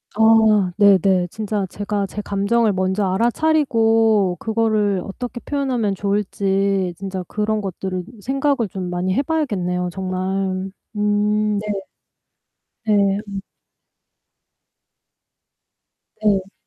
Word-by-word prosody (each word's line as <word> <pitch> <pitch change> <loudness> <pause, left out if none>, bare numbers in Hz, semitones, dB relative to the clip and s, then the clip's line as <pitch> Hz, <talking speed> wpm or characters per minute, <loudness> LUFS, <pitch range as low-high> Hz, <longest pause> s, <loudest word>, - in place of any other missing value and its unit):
아 220 -3 +5
네네. 190 -3 +4
진짜 210 -2 -2
제가 205 +1 -2
제 205 +2 -6
감정을 205 +3 +1
먼저 190 +2 0
알아차리고 225 - +2
그거를 215 -3 +1
'어떻게 240 +4 -6
표현하면 255 -8 -1
좋을지.' 195 -1 0
진짜 190 -1 -5
그런 215 0 -1
것들을 185 -1 -4 0.2
생각을 270 -1 0
좀 185 -1 -5
많이 180 +1 -1
해 275 - +2
봐야겠네요 185 - -1
정말. 190 +1 -2 0.2
음 210 0 +1
네. - - -4 1.2
네 200 -2 +3
음. 195 -1 -5 2.8
네. 195 -2 +1
205 Hz, 205 characters per minute, -20 LUFS, 190-220 Hz, 2.8 s, 아